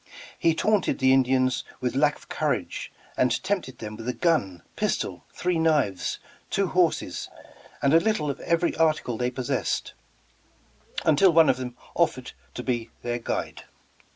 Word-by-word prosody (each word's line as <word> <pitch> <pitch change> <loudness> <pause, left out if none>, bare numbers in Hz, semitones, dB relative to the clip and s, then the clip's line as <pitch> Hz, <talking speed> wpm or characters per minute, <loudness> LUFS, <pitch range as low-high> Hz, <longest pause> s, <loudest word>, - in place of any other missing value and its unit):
He 165 -1 +3
taunted 210 -6 +2
the 130 0 +4
Indians 130 -1 +2 0.2
with - - -2
lack - - +3
of - - -18
courage - - -2 0.2
and 125 +5 +1
tempted 185 -10 -2
them 110 -1 -7
with 115 +3 -5
a - - 0
gun, 115 - 0
pistol, - - -2
three 180 -2 -1
knives, 150 - +1 0.3
two 195 - +1
horses 180 -3 0 0.5
and 140 +1 +4
a 165 - +8
little 215 -4 0
of 140 - -8
every 170 +1 +1
article 155 -6 +2
they 125 +2 0
possessed, 125 -1 -2 1.1
until 160 +5 +5
one 165 -1 +6
of 125 - +3
them 125 -1 -6 0.2
offered - - 0 0.2
to - - -4
be 120 -3 -2
their 120 0 -2
guide. 115 - -4
135 Hz, 155 wpm, -26 LUFS, 125-165 Hz, 1.1 s, a